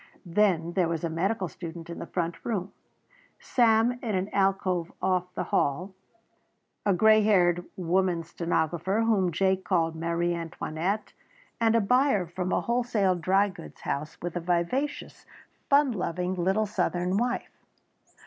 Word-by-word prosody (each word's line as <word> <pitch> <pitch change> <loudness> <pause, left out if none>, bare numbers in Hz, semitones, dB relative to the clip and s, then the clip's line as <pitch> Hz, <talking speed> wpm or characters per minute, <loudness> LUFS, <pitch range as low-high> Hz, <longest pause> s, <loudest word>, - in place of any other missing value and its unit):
Then 175 -2 +1
there 180 -2 +2
was 165 -1 -3
a 165 - -1
medical 190 +4 -1
student 170 -1 -8
in 170 - -7
the 170 - -6
front 170 -2 -3
room, 200 -4 -2 0.7
Sam 235 0 +3
in 220 -4 -2
an 190 +2 -1
alcove 190 -3 0
off 180 -1 0
the - - -1
hall, 180 +8 0 0.9
a - - +5
grey 215 +4 +5
haired 175 -4 +3
woman 180 -1 +1
stenographer, 170 +4 -1
whom 200 -6 +2
Jake 190 +2 +1
called 165 -3 +1
Marie 170 +1 -1
Antoinette, 170 +4 -3 0.5
and 225 -1 +3
a 230 - +4
buyer 250 -2 +3
from 180 +2 -4
a - - +2
wholesale 235 -5 +1
dry 190 +4 +2
goods 175 -3 -12
house, 150 +3 -4
with 175 0 -4
a - - 0
vivacious, 180 - -2 0.4
fun 280 -1 +5
loving 180 -3 -2
little 190 +4 +1
Southern 180 -3 -1
wife. 245 +2 -2
185 Hz, 145 wpm, -27 LUFS, 170-210 Hz, 0.9 s, a